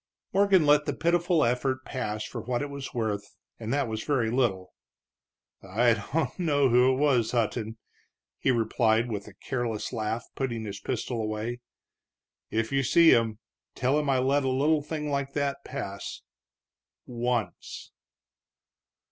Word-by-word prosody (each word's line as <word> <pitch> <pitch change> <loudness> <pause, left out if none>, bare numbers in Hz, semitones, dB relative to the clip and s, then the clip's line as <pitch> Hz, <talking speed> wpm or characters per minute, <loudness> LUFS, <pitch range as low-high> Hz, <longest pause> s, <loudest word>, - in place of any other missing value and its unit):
Morgan 195 -4 +4
let 145 0 +5
the - - -1
pitiful 170 -1 +2
effort 130 +2 0
pass 110 -5 -3
for 120 - -6
what 120 +3 -2
it 145 - -5
was 140 -1 -6
worth, 105 -4 -3 0.2
and 115 0 -4
that 140 -2 +1
was 110 -1 -4
very 125 -7 +1
little. 105 -8 0 0.9
"I 115 +5 +2 0.2
don't 165 +5 -1
know 145 -6 +3
who 125 +2 +5
it - - +1
was, 130 -6 +2
Hutton," 115 -1 -1 0.6
he - - +1
replied, 115 -1 +2
with 100 -1 -4
a 100 - -13
careless 120 -1 -3
laugh, 110 0 -2
putting 120 -4 -3
his 100 -1 -6
pistol 120 -1 -3
away. 110 +3 -3 0.9
"If 115 0 -1
you 135 0 +2
see 165 +6 +6
him, 115 -2 +3 0.4
tell 135 +4 +2
him 150 -2 -1
I 135 - +3
let 135 +2 +2
a 135 - +1
little 145 +4 +2
thing 150 0 -4
like 140 -1 -2
that 140 -1 -1
pass 100 -7 -6 0.8
once." 120 -4 -3
125 Hz, 150 wpm, -27 LUFS, 110-140 Hz, 0.9 s, see